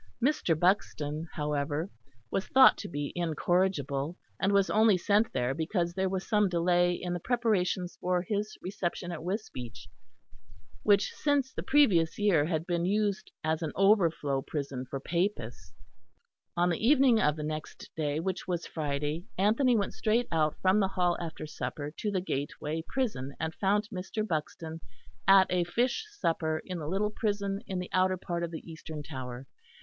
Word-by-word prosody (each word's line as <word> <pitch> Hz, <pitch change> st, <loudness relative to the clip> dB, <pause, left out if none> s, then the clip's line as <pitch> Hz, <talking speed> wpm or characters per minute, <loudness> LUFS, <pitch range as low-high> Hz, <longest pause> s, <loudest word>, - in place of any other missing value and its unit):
Mr. 235 Hz, -, +1 dB
Buxton, 160 Hz, -4 st, 0 dB
however, 150 Hz, +2 st, -1 dB, 0.4 s
was 195 Hz, -, -1 dB
thought 265 Hz, 0 st, +7 dB
to -, -, -5 dB
be 145 Hz, -3 st, -4 dB
incorrigible, 165 Hz, -3 st, 0 dB, 0.2 s
and 195 Hz, -, +2 dB
was 200 Hz, -1 st, +4 dB
only 215 Hz, -2 st, +5 dB
sent 205 Hz, +5 st, +2 dB
there 125 Hz, 0 st, 0 dB
because 170 Hz, +3 st, -1 dB
there 190 Hz, +1 st, 0 dB
was 190 Hz, 0 st, -3 dB
some 210 Hz, -2 st, +3 dB
delay 175 Hz, 0 st, +3 dB
in 175 Hz, 0 st, -4 dB
the 175 Hz, -, -2 dB
preparations 200 Hz, -5 st, 0 dB
for 180 Hz, -1 st, +1 dB
his 210 Hz, +2 st, -3 dB
reception 180 Hz, -1 st, -3 dB
at 170 Hz, -, -5 dB
Wisbeach, 130 Hz, -, -5 dB, 0.9 s
which 205 Hz, -1 st, +3 dB
since 285 Hz, -3 st, 0 dB
the -, -, -4 dB
previous 195 Hz, -, +3 dB
year 195 Hz, -8 st, +3 dB
had 160 Hz, -1 st, -1 dB
been 175 Hz, -2 st, 0 dB
used 205 Hz, +1 st, 0 dB
as 160 Hz, +1 st, 0 dB
an 160 Hz, -3 st, -2 dB
overflow 170 Hz, -9 st, +3 dB
prison 135 Hz, -3 st, -4 dB
for 135 Hz, -, -3 dB
Papists. 170 Hz, -, -2 dB, 0.9 s
On 175 Hz, +1 st, +3 dB
the 170 Hz, -, -2 dB
evening 260 Hz, -2 st, +5 dB
of 150 Hz, 0 st, +3 dB
the 155 Hz, -, -5 dB
next 155 Hz, 0 st, -6 dB
day, 150 Hz, -1 st, -1 dB
which 185 Hz, +2 st, -3 dB
was 175 Hz, -2 st, -2 dB
Friday, 150 Hz, +2 st, -3 dB
Anthony 230 Hz, +6 st, +3 dB
went 200 Hz, -, -1 dB
straight 230 Hz, +2 st, +1 dB
out 155 Hz, -2 st, +2 dB
from 190 Hz, +2 st, +4 dB
the 195 Hz, -, +3 dB
Hall 180 Hz, -2 st, +1 dB
after 165 Hz, -2 st, -5 dB
supper 150 Hz, -1 st, -5 dB
to 210 Hz, -, -2 dB
the 190 Hz, -3 st, 0 dB
gateway 150 Hz, 0 st, -3 dB
prison, 210 Hz, -, -2 dB
and 160 Hz, 0 st, -2 dB
found 205 Hz, +3 st, +1 dB
Mr. 205 Hz, +4 st, -3 dB
Buxton 160 Hz, 0 st, -4 dB, 0.5 s
at 195 Hz, -1 st, +8 dB
a 180 Hz, -1 st, +2 dB
fish 250 Hz, -, 0 dB
supper 160 Hz, -, -1 dB
in 180 Hz, -2 st, -4 dB
the 150 Hz, -, -5 dB
little 200 Hz, +5 st, 0 dB
prison 200 Hz, -2 st, -1 dB
in 190 Hz, -, -3 dB
the 180 Hz, 0 st, -5 dB
outer 185 Hz, 0 st, +3 dB
part 175 Hz, -1 st, -3 dB
of 170 Hz, -, -2 dB
the 160 Hz, 0 st, -8 dB
eastern 160 Hz, -2 st, -7 dB
tower. 130 Hz, -3 st, -7 dB
175 Hz, 165 wpm, -30 LUFS, 155-200 Hz, 0.9 s, at